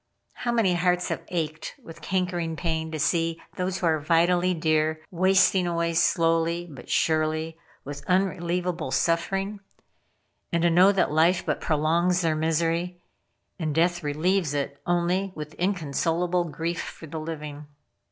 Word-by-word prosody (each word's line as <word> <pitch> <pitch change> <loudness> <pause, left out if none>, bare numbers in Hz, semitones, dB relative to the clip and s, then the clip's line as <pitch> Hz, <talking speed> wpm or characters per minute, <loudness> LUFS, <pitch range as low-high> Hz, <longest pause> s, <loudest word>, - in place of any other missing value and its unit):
How 240 - -2
many 225 -6 +2
hearts 180 0 +1
have - - -2
ached 155 -3 -4
with 165 - -12
cankering 180 -3 -1
pain 160 -1 -2
to 160 - -3
see 165 +2 0 0.2
those 185 0 -2
who - - -2
are 160 -2 +2
vitally 175 +4 +2
dear, 155 -1 +1
wasting 185 0 +3
away 170 -1 0
slowly, 165 +1 +2
but 135 -6 -12
surely, 155 0 +1 0.3
with 140 0 -7
unrelievable 180 -2 0
suffering; 195 +4 0 0.9
and 170 0 +1
to 170 - +4
know 180 +4 +6
that 195 -6 +1
life 165 +4 +3
but - - -1
prolongs 170 +4 +1
their 160 -2 +1
misery, 165 +3 0 0.6
and 155 -3 -2
death 175 +1 +2
relieves 155 +2 0
it 140 0 -3
only 175 +2 0
with 150 0 -7
inconsolable 175 0 0
grief 165 +2 -3
for - - -9
the 160 +1 -6
living. 150 -2 -7
170 Hz, 140 wpm, -26 LUFS, 160-180 Hz, 0.9 s, know